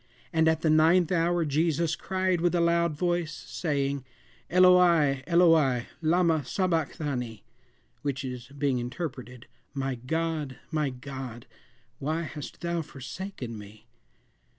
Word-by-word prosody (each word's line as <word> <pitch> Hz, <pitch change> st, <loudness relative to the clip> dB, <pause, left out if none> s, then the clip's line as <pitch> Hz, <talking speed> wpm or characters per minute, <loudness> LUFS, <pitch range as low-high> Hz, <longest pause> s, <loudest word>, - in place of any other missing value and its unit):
"And 160 Hz, 0 st, +3 dB
at 160 Hz, 0 st, +2 dB
the 160 Hz, -, +2 dB
ninth 165 Hz, +3 st, +4 dB
hour 170 Hz, -1 st, +2 dB
Jesus 160 Hz, +2 st, +1 dB
cried 185 Hz, -2 st, -1 dB
with 175 Hz, 0 st, +2 dB
a -, -, +2 dB
loud 170 Hz, -1 st, +2 dB
voice, 175 Hz, -1 st, 0 dB
saying, 140 Hz, -4 st, -2 dB, 0.5 s
Eloi, 175 Hz, -6 st, +5 dB
Eloi, 160 Hz, -8 st, +4 dB, 0.2 s
lama 165 Hz, 0 st, +3 dB
sabacthani, 145 Hz, -, -2 dB, 0.6 s
which 135 Hz, -2 st, -3 dB
is, 125 Hz, -2 st, -6 dB
being 140 Hz, -2 st, -1 dB
interpreted, 125 Hz, -2 st, -6 dB, 0.3 s
My 135 Hz, -1 st, -1 dB
God, 150 Hz, +2 st, -2 dB
my 155 Hz, -3 st, 0 dB
God, 130 Hz, -2 st, -8 dB, 0.5 s
why 160 Hz, +4 st, -1 dB
hast 150 Hz, -2 st, -8 dB
thou 170 Hz, -1 st, -1 dB
forsaken 135 Hz, -, -7 dB
me?" 105 Hz, +1 st, -12 dB
155 Hz, 120 wpm, -28 LUFS, 135-170 Hz, 0.6 s, Eloi